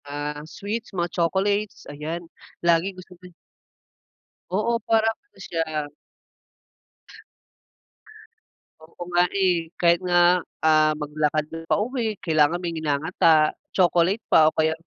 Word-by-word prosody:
Ah, 145 +1 -5
sweets 210 +3 -6
mga 175 -1 -2
chocolates 195 +4 -1
ayan 160 +4 -5 0.4
lagi 170 +3 +2
gusto 185 0 -13
ni 180 0 -13 1.2
Oo 225 +5 0
parang 225 0 +2
ano 410 - -30
siya. 155 -3 -3 2.9
Oo 160 +2 -17
nga, 175 0 +5
eh, 180 -4 0
kahit 170 0 +4
nga, 175 0 +3 0.2
ah, 155 -1 +4
maglakad 150 0 -1
na 165 - -5
pauwi 225 -1 -1
kailangan 155 0 +2
may 170 -1 -3
nginangata, 155 0 +2 0.2
chocolate 180 +3 +2
pa 155 0 +6
o - - -12
kaya, 160 0 +2
170 Hz, 115 wpm, -24 LUFS, 155-190 Hz, 2.9 s, pa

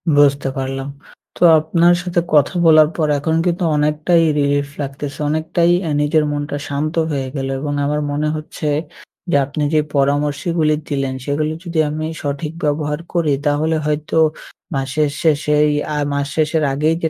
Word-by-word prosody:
বুঝতে 145 -1 +3
পারলাম। 135 0 -3 0.5
তো - - -15 0.2
আপনার 170 +3 +3
সাথে 180 -1 -1
কথা 150 +2 +4
বলার 155 -1 +7
পর 155 -2 +1
এখন 160 +2 0
কিন্তু 175 0 0
অনেকটাই 150 +3 +2 0.2
রিলিফ 145 0 +1
লাগতেছে, 140 +1 -6
অনেকটাই 160 +3 +1 0.2
এ - - -1
নিজের 150 +1 +2
মনটা 145 0 -3
শান্ত 145 +2 -2 0.2
হয়ে 135 -2 -2
গেলো 135 -1 -2
এবং 145 +1 -3
আমার 150 +1 0
মনে 150 +1 -1
হচ্ছে, 155 0 -5 0.6
যে - - +3
আপনি 145 +2 -3
যে 155 - +4 0.2
পরামর্শগুলি 150 +3 +1 0.2
দিলেন 135 -2 -1
সেগুলো 150 +2 -1
যদি 170 -3 -2
আমি 155 +1 -3 0.2
সঠিক 145 +1 -3
ব্যবহার 150 0 -1
করি। 170 -4 +1
তাহলে 150 +2 +1
হয়তো 150 +1 -2 0.6
মাসের 135 +3 0
শেষেই, 150 -1 +3 0.3
আ - - -1 0.2
মাস 140 0 -1
শেষের 155 0 +1
আগেই 155 +4 +1
যে 160 - +2
150 Hz, 155 wpm, -18 LUFS, 145-155 Hz, 0.6 s, বলার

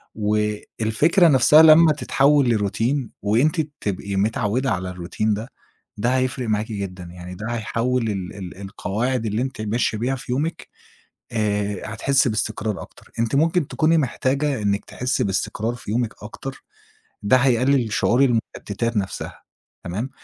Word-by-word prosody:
والفكرة 110 - +1
نفسها 150 +1 +6
لمّا 160 0 +7
تتحوِّل 140 -2 +3
لروتين 115 +5 0
وأنتِ 135 - +2 0.2
تبقي 100 0 -3
متعوِّدَة 110 +4 0
على 95 -2 -2
الروتين 90 +4 -2
ده، 110 +4 -5 0.5
ده 120 +5 +1
هيفرق 130 -1 -1
معاكِ 105 +1 0
جدًا، 95 -2 -5
يعني 90 +1 -9
ده 105 +4 -6
هيحَوّل 120 +2 -1
ال 95 -1 -5
ال 95 -2 -8
القواعد 110 +5 -2
اللي 105 +2 -1
أنتِ 130 -4 -4
ماشية 110 0 0
بيها 130 +3 0
في 125 - -7
يومِك 155 +5 -2 0.7
آآ 105 -2 -1
هتحسّي 140 +3 +2
باستقرار 105 -1 -2
أكتر. - - -15
أنتِ 115 +3 0
ممكن 165 0 +2
تكوني 160 +1 +2
محتاجة 135 -1 0
إنِّك 100 0 0
تحسّي 125 +1 -2
باستقرار 105 +4 -2
في 110 -3 -8
يومِك 115 -1 0
أكتر، 135 +5 -8 0.6
ده 100 +5 +4
هيقلِّل 125 -2 +2
شعور 120 +5 +3
المُشتّتات 115 -2 -1
نفسها، 95 -1 -5 0.4
تمام؟ 105 +10 -4
115 Hz, 140 wpm, -22 LUFS, 105-135 Hz, 0.7 s, لمّا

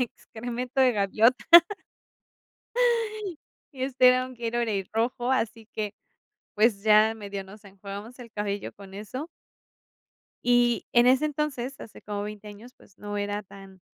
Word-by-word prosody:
excremento 245 +2 -4
de 255 -1 +5
gaviota. 220 +4 +2 2.3
Y 260 -2 -7
este 255 -1 +4
era 255 0 +3
un 255 - -11
Gatorade 230 -4 -2
rojo, 240 +2 -1
así 225 -3 -2
que 210 -2 -3 0.6
pues 210 -2 +2
ya 215 +1 +5
medio 200 -2 -6
nos 205 +3 -14
enjuagamos 200 +4 -9
el 240 -2 -11
cabello 205 -1 -3
con 195 -1 -13
eso. 235 +10 -6 1.2
Y 245 -1 +3
en 240 0 +5
ese 260 +4 +4
entonces, 275 -3 -3
hace 220 - -11
como 205 -1 -4
veinte 210 0 -8
años, 215 +5 -13
pues 190 - -22
no 205 0 -5
era 205 0 -2
tan 195 -1 -14
220 Hz, 140 wpm, -26 LUFS, 205-250 Hz, 2.3 s, de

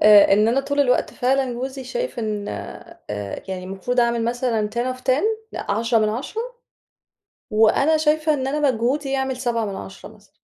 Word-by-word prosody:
آآ، 210 -2 +8
إن 210 +2 +4
أنا 250 +4 +2
طول 285 +1 -1
الوقت 250 -3 +2
فعلًا 260 0 +1
جوزي 260 +2 -5
شايف - - -4
إن 210 -2 -3 0.6
آآ، 105 -1 -5
يعني 185 -1 -4
المفروض 195 +7 -1
أعمل 235 -1 +1
مثلًا 235 -3 0
10 255 +2 -1
of - - -15
10 260 +3 +1 0.3
لأ، - - -5
10 230 +2 +2
من 215 -1 +2
10 255 - -3 1.1
وأنا 225 +8 +4
شايفة 310 0 +2
إن 265 -2 -2
أنا 290 +1 +2
مجهودي 265 +5 -1
يعمل 265 -1 -1
7 240 -3 -1
من 200 -2 -4
10 190 0 -9
مثلًا. 205 -1 -25
245 Hz, 180 wpm, -22 LUFS, 215-270 Hz, 1.1 s, آآ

